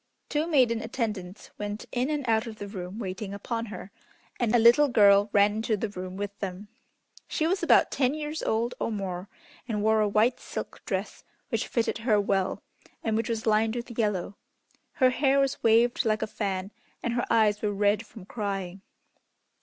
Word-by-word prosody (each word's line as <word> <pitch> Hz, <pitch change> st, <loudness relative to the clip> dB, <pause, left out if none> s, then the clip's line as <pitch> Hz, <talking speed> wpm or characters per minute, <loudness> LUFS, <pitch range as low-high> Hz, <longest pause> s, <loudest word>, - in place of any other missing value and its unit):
Two 305 Hz, +2 st, 0 dB
maiden 250 Hz, -8 st, +3 dB
attendants 215 Hz, -5 st, -4 dB
went 205 Hz, +1 st, -4 dB
in 250 Hz, +3 st, 0 dB
and 295 Hz, -4 st, -2 dB
out 225 Hz, +1 st, +2 dB
of 225 Hz, -, -7 dB
the 205 Hz, -, -6 dB
room 190 Hz, -1 st, -7 dB
waiting 200 Hz, -1 st, -5 dB
upon 230 Hz, +3 st, -4 dB
her, 200 Hz, -1 st, -8 dB, 0.5 s
and 240 Hz, -1 st, +2 dB
a -, -, +7 dB
little 240 Hz, +6 st, +6 dB
girl 205 Hz, -4 st, +5 dB
ran 205 Hz, +1 st, +4 dB
into 220 Hz, -1 st, 0 dB
the 215 Hz, +2 st, -2 dB
room 185 Hz, -1 st, -7 dB
with 205 Hz, 0 st, -4 dB
them. 195 Hz, +1 st, -5 dB, 0.6 s
She 315 Hz, -, -1 dB
was 370 Hz, +4 st, +1 dB
about -, -, +4 dB
ten 265 Hz, +1 st, +1 dB
years 305 Hz, +1 st, -4 dB
old 230 Hz, +2 st, 0 dB
or -, -, -1 dB
more, 195 Hz, -2 st, -4 dB, 0.4 s
and 210 Hz, -3 st, -2 dB
wore 220 Hz, 0 st, +3 dB
a 210 Hz, -, +2 dB
white 220 Hz, +4 st, +2 dB
silk -, -, -7 dB
dress, -, -, -3 dB, 0.3 s
which -, -, -1 dB
fitted 230 Hz, -1 st, -1 dB
her 225 Hz, -2 st, +2 dB
well 195 Hz, -2 st, 0 dB, 0.4 s
and 220 Hz, -1 st, 0 dB
which 225 Hz, +1 st, -1 dB
was 225 Hz, -1 st, -2 dB
lined 220 Hz, +1 st, +2 dB
with 240 Hz, 0 st, -6 dB
yellow. 205 Hz, -4 st, -1 dB, 0.6 s
Her 255 Hz, -2 st, +4 dB
hair 275 Hz, +1 st, +2 dB
was 275 Hz, 0 st, 0 dB
waved 230 Hz, +2 st, +4 dB
like 215 Hz, -1 st, +1 dB
a -, -, +1 dB
fan, 195 Hz, -2 st, -3 dB, 0.3 s
and 235 Hz, -, -1 dB
her 240 Hz, -, 0 dB
eyes 215 Hz, -2 st, +3 dB
were 210 Hz, -, 0 dB
red 205 Hz, +1 st, +2 dB
from 205 Hz, -5 st, -12 dB
crying. 195 Hz, -3 st, -4 dB
220 Hz, 185 wpm, -27 LUFS, 200-235 Hz, 0.6 s, a